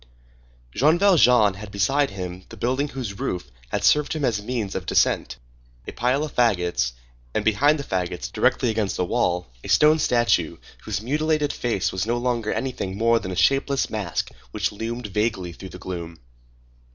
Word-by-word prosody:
Jean 155 +6 +4
Valjean 125 - +5
had 100 +2 -9
beside 135 +9 +1
him 90 -1 -6
the - - -11
building 130 +4 0
whose 120 -8 -6
roof 90 - -3 0.2
had - - -2
served 150 -1 +3
him 155 -3 -1
as 115 -5 +1
a - - -10
means 110 -4 -3
of - - -5
descent, 65 +1 +1 0.5
a - - -4
pile 125 +5 0
of 155 - -5
fagots, 90 - +1 0.4
and, - - 0
behind 145 +8 +4
the 140 - -4
fagots, 90 -5 -3
directly 120 - +2
against 110 -3 -1
the 90 - 0
wall, 90 -4 0 0.2
a - - -8
stone 155 +1 +5
statue, 120 -4 +2 0.3
whose 105 - -3
mutilated 150 +3 0
face 115 -6 -1
was 95 +3 -2
no 120 +1 +1
longer 120 -3 -1
anything 110 -8 -3
more 115 +1 +3
than 95 - -6
a 90 - -4
shapeless 135 +8 +2
mask 100 -6 -2 0.2
which - - -1
loomed 115 +3 -5
vaguely 105 -4 -1
through 95 +2 -10
the 90 - -10
gloom. 85 -3 -6
115 Hz, 175 wpm, -23 LUFS, 95-135 Hz, 0.5 s, Valjean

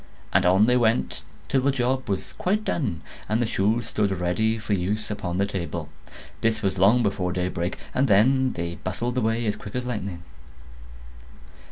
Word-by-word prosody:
And 95 -1 +4
on 95 +4 +5
they 125 +2 +4
went, 115 -1 +1 0.3
till 135 - +2
the 140 - +2
job 130 -1 -1
was 95 -2 -2
quite 205 +4 0
done, 105 - -1 0.3
and 110 +2 +2
the 120 - +2
shoes 110 +1 +1
stood 105 -2 0
ready 95 +5 0
for 105 -1 -2
use 100 +3 -1
upon 90 -4 -3
the 100 - +2
table. 85 -5 -4 0.5
This 110 -1 +1
was 95 -1 0
long 110 +6 +5
before 95 -3 0
daybreak; 90 0 -2 0.2
and 135 +2 +2
then 130 +5 +4
they 85 0 -4
bustled 120 +7 -2
away 115 0 0
as 105 -1 0
quick 100 - -9
as 125 0 -2
lightning. 100 -8 -4
105 Hz, 175 wpm, -25 LUFS, 95-120 Hz, 0.5 s, on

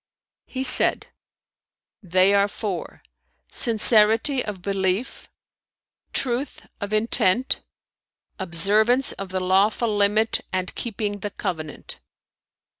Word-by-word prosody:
'" - - -70
He 260 - -2
said 255 - +4 0.9
"They 185 +1 +3
are 200 0 +3
four: 200 -4 -6 0.5
sincerity 225 +3 +3
of 195 -4 -7
belief, 195 +4 -2 0.8
truth 255 +2 -3
of 205 -1 -6
intent, 215 +2 +1 0.8
observance 210 +8 +2
of 195 -1 -8
the 185 0 -3
lawful 205 +4 +1
limit 210 +2 +1
and 185 -1 -3
keeping 205 -3 -4
the 205 - -5
covenant." 160 -7 -7
205 Hz, 100 wpm, -23 LUFS, 190-225 Hz, 0.9 s, said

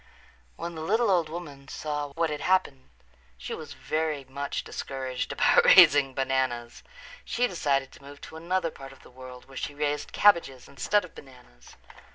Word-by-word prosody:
When 170 0 -6
the 160 - -7
little 220 +6 +2
old 170 -4 +2
woman 150 -5 -8
saw 150 0 -4
what 165 +1 0
had 150 - -4
happened 180 -8 0 0.5
she - - -6
was - - -8
very 155 -2 -2
much 140 +2 -4
discouraged 130 -2 -5
about - - +4
raising 140 -2 +7
bananas. 130 -3 -1 0.4
She 245 - 0
decided 140 - -1
to - - -16
move 145 +1 -12
to - - -11
another 170 +1 -1
part 135 -2 -11
of 135 - -19
the - - -16
world 125 0 -12
where 135 -1 -13
she 145 - -4
raised 150 0 -2
cabbages 170 -11 +3
instead 180 +10 0
of 180 - -16
bananas. 125 - -16
145 Hz, 170 wpm, -27 LUFS, 135-165 Hz, 0.5 s, raising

